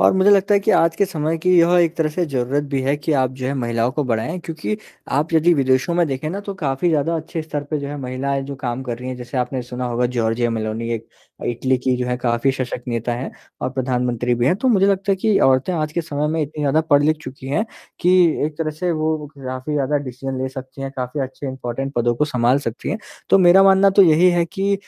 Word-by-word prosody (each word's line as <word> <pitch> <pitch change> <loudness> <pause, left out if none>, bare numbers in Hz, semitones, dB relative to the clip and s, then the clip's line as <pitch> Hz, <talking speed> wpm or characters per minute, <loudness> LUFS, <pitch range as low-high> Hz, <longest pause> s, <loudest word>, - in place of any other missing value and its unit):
और - - +5
मुझे 190 +2 +5
लगता 200 +1 +4
है 200 - +4
कि - - +1
आज 165 0 +3
के 200 - +3
समय 160 -3 -2
की 180 +1 +3
यह 170 +1 +5
एक 170 -1 +2
तरह 160 -2 +1
से 175 +3 -1
ज़रूरत 140 +1 -1
भी 135 - +1
है 140 +2 +1
कि 150 +2 -2
आप 130 -1 +1
जो 130 -1 -4
है 140 - -1
महिलाओं 120 -1 0
को 150 -1 -1
बढ़ाएँ, 120 +8 -2
क्योंकि 165 +6 -4 0.4
आप 155 +4 0
यदि 165 +2 +4
विदेशों 130 +4 +1
में 175 -1 +3
देखें 135 +3 -3
ना, 200 +3 -4
तो 200 -1 -6
काफ़ी 150 -1 -1
ज़्यादा 165 +1 +1
अच्छे 160 +1 -5
स्तर 150 -2 -4
पे 155 - 0
जो 140 0 -5
है 145 - -5
महिलाएँ 135 +2 -2
जो 140 +1 -6
काम 130 -1 -4
कर 120 -2 -5
रही 125 +1 -6
हैं। 130 - -4
जैसे 125 +1 -7
आपने 125 +1 -2
सुना 125 +1 -5
होगा 120 0 0
जॉर्जिया 115 +1 +1
मेलोनी, 110 +1 -3
एक 115 0 -7 0.3
अ, - - -6
इटली 130 +2 0 0.2
जो 125 0 -2
है 125 0 -1
काफ़ी 120 +2 +1
सशक्त 125 -2 -4
नेता 120 0 -2
हैं 125 +3 -5 0.3
और 130 - -2
प्रधानमंत्री 125 -2 -1
भी 120 +1 0
हैं, 175 - +4
तो 260 +5 0
मुझे 195 -5 +4
लगता 195 0 +1
है - - 0
कि 205 0 +2
औरतें 135 +7 +3
आज 155 -2 -2
के 170 - 0
समय 150 -2 -2
में 160 0 -1
इतनी 150 +1 -5
ज़्यादा 145 +2 +3
पढ़ 145 0 +6
ली 155 +1 +4
चुकी 135 -4 -10
हैं, 205 +10 0 0.4
कि 180 - +3 0.4
एक 150 -1 -8
तरह 155 -2 -1
से 175 +4 -2
वो 155 -1 -1
काफ़ी 130 +2 -5
ज़्यादा 145 0 +1
डिसीज़न 130 +1 -5
ले 130 - -1
सकती 130 +1 -9
हैं, 135 - -4
काफ़ी 130 +3 -3
अच्छे 135 +2 -5
इम्पोर्टेंट 130 +1 -4
पदों 120 0 +1
को 150 - +2
सँभाल 125 -2 +2
सकती 115 - -5
हैं। 215 - -2 0.3
तो 195 - +7
मेरा 185 +1 +7
मानना 195 0 +6
तो 195 - +6
यही 175 +1 +5
है 175 -1 +2
कि 195 +2 -1
140 Hz, 255 wpm, -20 LUFS, 125-165 Hz, 0.4 s, तो